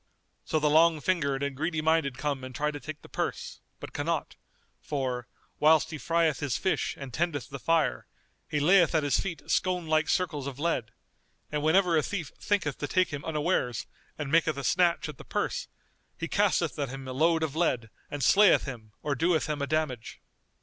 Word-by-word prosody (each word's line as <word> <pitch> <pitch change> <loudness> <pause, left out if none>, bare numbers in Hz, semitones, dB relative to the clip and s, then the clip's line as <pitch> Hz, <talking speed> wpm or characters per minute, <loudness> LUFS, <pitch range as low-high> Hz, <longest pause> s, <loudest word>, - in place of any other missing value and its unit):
So 160 - 0
the 150 - +2
long 160 +1 +5
fingered 140 -5 0
and 140 -1 -2
greedy 160 +3 -1
minded 155 -4 +1
come 140 -1 -2
and 130 0 -8
try 150 0 0
to 145 - -7
take 155 +3 -8
the - - -12
purse, - - -4 0.2
but - - -9
cannot; - - -2 0.5
for, 130 -4 -3 0.3
whilst 155 0 +4
he 155 - -5
frieth 165 -2 +1
his 135 -6 -1
fish 190 - -1
and 135 -3 -8
tendeth 150 -6 -2
the 140 - -6
fire, 165 +3 +1 0.4
he 150 - 0
layeth 170 +2 +5
at 155 - +3
his 145 - +2
feet 175 -4 -4
scone 180 -2 +1
like 155 0 +1
circles 155 -7 0
of 135 -2 -6
lead; 145 -7 -1 0.6
and 150 -1 -1
whenever 170 +3 +3
a 155 - +4
thief 170 -1 -4
thinketh 180 -10 -1
to 145 - -2
take 185 +2 +2
him 145 -2 -5
unawares 150 -6 -1 0.3
and 145 -2 -4
maketh 160 -2 +3
a 140 - -4
snatch 175 +3 +2
at 150 -4 -9
the - - -9
purse - - -2 0.5
he - - -3
casteth - - +1
at 140 -3 -1
him 135 +1 -7
a 130 - -4
load 160 +4 +2
of 155 -2 -2
lead 125 -10 0 0.2
and 145 -2 -4
slayeth 200 +6 +6
him 115 -6 -8
or 145 - 0
doeth 165 +3 +1
him 150 -2 -2
a 140 - -1
damage. 150 -6 -2
150 Hz, 200 wpm, -28 LUFS, 140-165 Hz, 0.6 s, slayeth